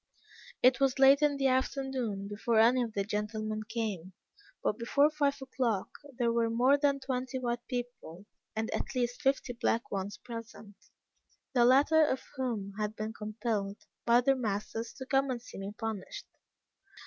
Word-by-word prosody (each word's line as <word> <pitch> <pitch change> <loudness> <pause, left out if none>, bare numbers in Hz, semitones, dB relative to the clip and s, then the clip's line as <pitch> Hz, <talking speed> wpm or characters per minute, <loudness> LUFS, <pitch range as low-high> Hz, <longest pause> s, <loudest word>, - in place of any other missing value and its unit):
"It 255 +1 +6
was 270 -1 +2
late 270 +2 +7
in 295 -1 +3
the 275 - -1
afternoon 260 -6 0
before 215 +3 -1
any 240 +3 +5
of 230 -3 -3
the 200 - 0
gentlemen 215 +1 -3
came; 215 -5 -4 0.5
but, 215 - 0
before 280 +6 +3
five 285 -2 0
o'clock, 245 -6 -1 0.3
there 240 -2 +2
were 230 0 +1
more 250 +5 +4
than 285 -1 +2
twenty 260 -1 -3
white 240 -1 -2
people, 245 - -6 0.3
and 220 +1 -2
at 270 - -3
least 245 +2 -1
fifty 270 -2 +1
black 235 0 -1
ones 195 +1 -3
present, 230 -3 -9 0.8
the 240 -2 +5
latter 290 +5 +5
of 265 -3 0
whom 230 -7 -3
had 210 0 -2
been 215 +1 -4
compelled, 210 -2 -3 0.3
by 235 +1 +5
their 270 +2 +3
masters, 225 -1 -3
to 260 - -8
come 270 +1 +2
and 250 -2 -2
see 235 - -11
me 195 +1 -5
punished. 225 - -5
240 Hz, 160 wpm, -31 LUFS, 215-265 Hz, 0.8 s, late